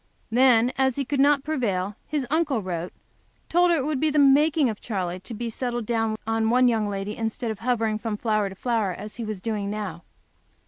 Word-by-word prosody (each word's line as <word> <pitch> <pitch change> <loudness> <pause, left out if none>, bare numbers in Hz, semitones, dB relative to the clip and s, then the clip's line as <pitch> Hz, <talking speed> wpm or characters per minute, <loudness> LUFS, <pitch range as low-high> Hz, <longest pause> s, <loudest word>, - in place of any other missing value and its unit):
Then, 245 0 +4
as 265 -2 +2
he 280 - -2
could 280 +2 -2
not 280 0 +4
prevail, 210 -10 -1
his 295 -4 -1
uncle 300 -8 +1
wrote, 175 -1 -4 0.6
told 350 +1 +4
her 340 - +3
it 270 - -1
would 300 -3 -1
be 310 - +2
the 300 - -1
making 290 +1 +5
of 215 -3 -4
Charley 185 -5 -3
to 210 +6 -8
be 235 +2 -4
settled 240 0 -3
down 225 -1 0
on 225 0 +1
one 250 +2 +4
young 220 -3 +1
lady 200 +1 -4
instead 225 +1 -3
of 215 - -7
hovering 225 -2 0
from 220 -2 -3
flower 215 -2 0
to 190 - -10
flower, 220 -3 0
as 210 +4 -8
he 235 - -4
was 215 -3 -4
doing 210 -1 -3
now. 205 -5 -4
225 Hz, 215 wpm, -25 LUFS, 210-265 Hz, 0.6 s, making